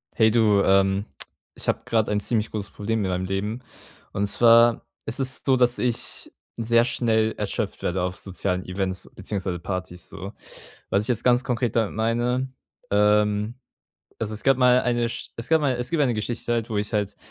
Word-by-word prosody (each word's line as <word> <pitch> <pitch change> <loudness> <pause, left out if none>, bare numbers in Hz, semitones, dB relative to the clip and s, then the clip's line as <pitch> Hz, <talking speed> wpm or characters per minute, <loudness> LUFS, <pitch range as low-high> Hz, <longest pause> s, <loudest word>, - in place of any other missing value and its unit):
Hey 110 -1 +4
du, 105 -3 +4
ähm, 95 +1 +3 0.5
ich - - -4
habe - - +1
gerade 115 -4 +1
ein 105 - +1
ziemlich 110 +1 0
großes 105 -2 -4
Problem 110 +2 -2
mit 95 - -1
meinem 90 +1 -1
Leben. 105 +6 -3 0.5
Und 100 - 0
zwar, 115 +2 +5 0.2
es 115 - -2
ist 130 -1 +1
so, 135 - +4
dass 125 -1 +3
ich 125 -2 -2 0.3
sehr 115 +1 +3
schnell 110 -3 +1
erschöpft - - -3
werde 90 +1 0
auf 90 +1 -2
sozialen 95 -1 -3
Events, 95 0 -3
beziehungsweise 95 -2 -3
Partys, 90 -1 -5
so. - - -8 0.6
Was 100 - +2
ich - - -4
jetzt 120 -2 +1
ganz 125 0 +4
konkret 120 -2 -1
damit 110 -3 +1
meine 120 +4 0 0.4
ähm, 105 +2 +2 0.6
also 110 -1 -3
es 105 - -5
gab 135 -1 +5
mal 125 0 +5
eine 120 -1 +1
Sch - - -7
es 115 +1 -6
gab 160 -1 +4
mal 140 -3 +1
es 125 +1 -3
gibt 165 -3 +2
eine 125 -4 +2
Geschichte 120 +2 -3
halt, 115 -1 -1
wo 110 - -2
ich 105 +2 -3
halt 105 -2 -1
110 Hz, 190 wpm, -24 LUFS, 100-120 Hz, 0.6 s, zwar